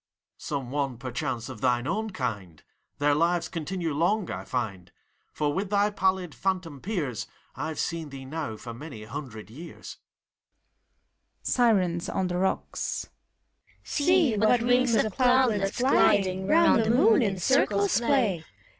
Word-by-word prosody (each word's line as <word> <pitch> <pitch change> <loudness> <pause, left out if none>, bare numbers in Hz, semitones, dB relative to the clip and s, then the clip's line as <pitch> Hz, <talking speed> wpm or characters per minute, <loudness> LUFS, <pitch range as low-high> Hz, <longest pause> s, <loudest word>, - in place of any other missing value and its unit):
Some 135 -4 -4
one, 140 -3 -2
perchance, 125 -1 -4
of 125 -5 -9
thine 125 -1 +1
own 215 +9 -1
kind! 100 - -5 0.3
Their 145 0 +2
lives 170 +3 +1
continue 170 0 -3
long, 175 +6 0
I - - -5
find; 100 -8 -4 0.4
For 145 -1 -1
with 190 +4 -2
thy 205 0 +2
pallid 190 -4 0
phantom 180 -7 -3
peers 145 - -3 0.3
I've 160 -1 -4
seen 165 -3 -3
thee 135 -1 -9
now 145 -5 -5
for 120 +1 -8
many 120 -3 -9
hundred 110 -3 -8
years. 165 +8 -10 1.5
SIRENS 190 -8 +2
(on 185 -1 -1
the 175 - -2
rocks). 190 +1 -2 0.7
See! 330 -5 +2
what 220 +3 +3
rings 245 -1 +3
of 215 -2 +1
cloudlets, 245 -6 +2
gliding 195 -7 +3
Round 325 -8 +5
the 220 - -1
moon, 230 0 +5
in 200 -4 0
circles 200 -1 +2
play 235 - +1
175 Hz, 135 wpm, -27 LUFS, 135-215 Hz, 1.5 s, Round